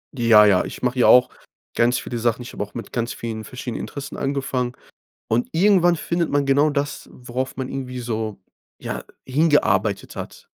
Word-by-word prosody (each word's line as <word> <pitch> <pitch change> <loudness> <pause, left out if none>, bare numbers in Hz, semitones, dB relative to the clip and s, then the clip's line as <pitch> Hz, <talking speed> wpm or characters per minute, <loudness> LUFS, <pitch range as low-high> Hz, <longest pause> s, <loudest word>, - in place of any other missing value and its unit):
Ja, 115 -4 +6
ja, 95 -3 +4
ich - - -8
mache 125 0 0
hier 125 - +4
auch 125 0 +7 0.5
ganz 120 +1 +3
viele 120 - -5
Sachen. 120 +1 0
Ich 120 - -9
habe - - -3
auch 105 - -11
mit 115 -4 -7
ganz 120 0 -2
vielen 110 -2 -5
verschiedenen 125 +1 -6
Interessen 140 -1 -7
angefangen 135 -3 -2 0.5
und 115 +2 +1
irgendwann 175 -1 +4
findet 170 +1 -1
man 145 -1 +1
genau 140 +3 +4
das, 145 0 -3
worauf 125 +1 -5
man 130 -1 -3
irgendwie 125 -2 -5
so, 110 -4 -3 0.4
ja, - - -5 0.2
hingearbeitet 115 - +1
hat. - - -8
125 Hz, 175 wpm, -22 LUFS, 115-140 Hz, 0.5 s, auch